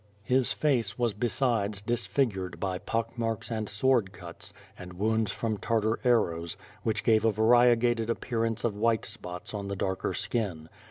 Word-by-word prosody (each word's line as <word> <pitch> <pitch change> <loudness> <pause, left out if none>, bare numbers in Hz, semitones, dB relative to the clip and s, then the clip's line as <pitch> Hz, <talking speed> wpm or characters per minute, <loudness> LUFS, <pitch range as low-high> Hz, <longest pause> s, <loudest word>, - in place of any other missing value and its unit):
His 130 +1 +3
face 120 -9 +1
was 120 -3 +1
besides 110 -2 +1
disfigured 105 -3 -1
by 95 -2 -2
pock 115 +2 -2
marks 115 +1 -2
and 110 -2 -2
sword 110 -1 +2
cuts, 85 -2 -8 0.2
and 90 0 -10
wounds 110 +2 0
from 110 -1 -2
Tartar 110 0 0
arrows, 85 -10 +1 0.2
which 110 -1 -1
gave 110 -1 +4
a 115 - +4
variegated 120 +1 +4
appearance 115 -1 -1
of 115 -4 0
white 115 +1 +1
spots 105 -1 -7
on 100 -1 -4
the 100 - -3
darker 95 0 -2
skin. 90 -9 -2
110 Hz, 155 wpm, -28 LUFS, 100-115 Hz, 0.2 s, gave